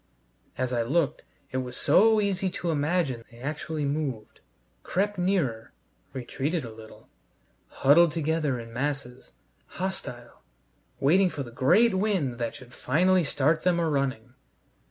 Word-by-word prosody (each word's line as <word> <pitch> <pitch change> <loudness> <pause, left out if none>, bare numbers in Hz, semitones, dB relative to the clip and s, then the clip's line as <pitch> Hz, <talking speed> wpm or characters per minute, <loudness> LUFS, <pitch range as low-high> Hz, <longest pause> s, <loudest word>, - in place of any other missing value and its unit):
As 130 0 -1
I 120 - +1
looked 145 +6 0 0.3
it 130 - -2
was 125 -1 -4
so 220 +2 +5
easy 195 -2 0
to 175 -2 -3
imagine 145 -5 0
they 115 - -16
actually 150 +3 -4
moved, 140 -7 -3 0.4
crept 205 +1 -1
nearer, 170 - 0 0.4
retreated 135 +4 -3
a 115 - -8
little, 110 0 -14 0.6
huddled 155 +4 +4
together 155 -4 -1
in 115 0 -10
masses, 130 -1 -4 0.4
hostile, 125 -10 -5 0.6
waiting 185 +7 +4
for 145 - -5
the 120 - -10
great 195 - +4
wind 185 - 0
that 115 -1 -3
should 125 -1 -13
finally 180 +7 +2
start 150 +2 +1
them 180 -1 +2
a 165 - +1
running. 130 -5 -2
145 Hz, 135 wpm, -27 LUFS, 125-175 Hz, 0.6 s, so